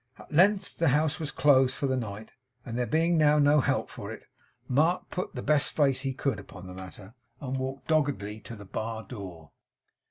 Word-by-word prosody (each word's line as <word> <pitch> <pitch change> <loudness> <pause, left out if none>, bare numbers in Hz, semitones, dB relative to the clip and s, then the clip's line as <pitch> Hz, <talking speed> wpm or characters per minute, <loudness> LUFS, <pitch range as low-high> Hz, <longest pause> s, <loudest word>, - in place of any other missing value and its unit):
At - - -15
length 190 +6 +3
the 165 - +3
house 150 +2 +2
was 155 -2 -3
closed 130 -2 +4
for - - -1
the 130 -1 +1
night; 110 -3 -5 0.3
and 115 - -5
there 125 0 0
being 165 +2 +2
now 150 -1 +5
no 145 0 +5
help - - 0
for - - -8
it, - - -9 0.4
Mark 155 +7 +1
put 185 - -4
the 125 - -4
best 150 -1 +2
face 135 -3 +2
he 135 -1 -1
could 130 -2 -2
upon 90 -2 -11
the 90 - -8
matter, 95 +2 -11 0.3
and 130 -2 -4
walked 130 +1 -4
doggedly 140 -10 0
to 115 - -9
the 105 -2 -11
bar 110 +3 -4
door. 90 - -9
135 Hz, 200 wpm, -28 LUFS, 110-150 Hz, 0.4 s, now